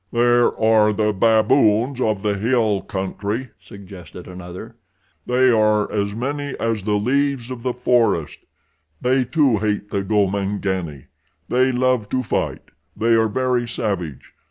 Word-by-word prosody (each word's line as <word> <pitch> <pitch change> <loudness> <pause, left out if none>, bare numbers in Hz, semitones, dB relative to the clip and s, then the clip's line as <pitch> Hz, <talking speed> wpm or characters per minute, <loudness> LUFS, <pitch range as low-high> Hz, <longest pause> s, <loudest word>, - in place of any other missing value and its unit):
"There 120 0 +2
are 110 -1 +4
the 105 0 0
baboons 115 +3 +2
of 110 -4 0
the 105 -1 0
hill 110 -1 +1
country," 100 +6 -4
suggested 95 -3 -12
another. 90 +5 -9 0.5
"They 125 +1 +3
are 105 -2 +2
as 100 0 -2
many 140 +3 -3
as 115 -2 -1
the 105 -1 +1
leaves 130 +3 0
of 125 -2 -6
the 125 0 -2
forest. 120 - +1 0.6
They, 130 +1 +2
too, 130 -4 +2
hate 105 -1 -2
the 100 - -1
Gomangani. 95 - -1 0.4
They 130 +1 +2
love 125 -4 0
to 130 0 -1
fight. 105 - -2 0.3
They 115 +1 +2
are 115 0 +3
very 125 +2 -1
savage. 95 - -4
110 Hz, 135 wpm, -21 LUFS, 100-125 Hz, 0.6 s, are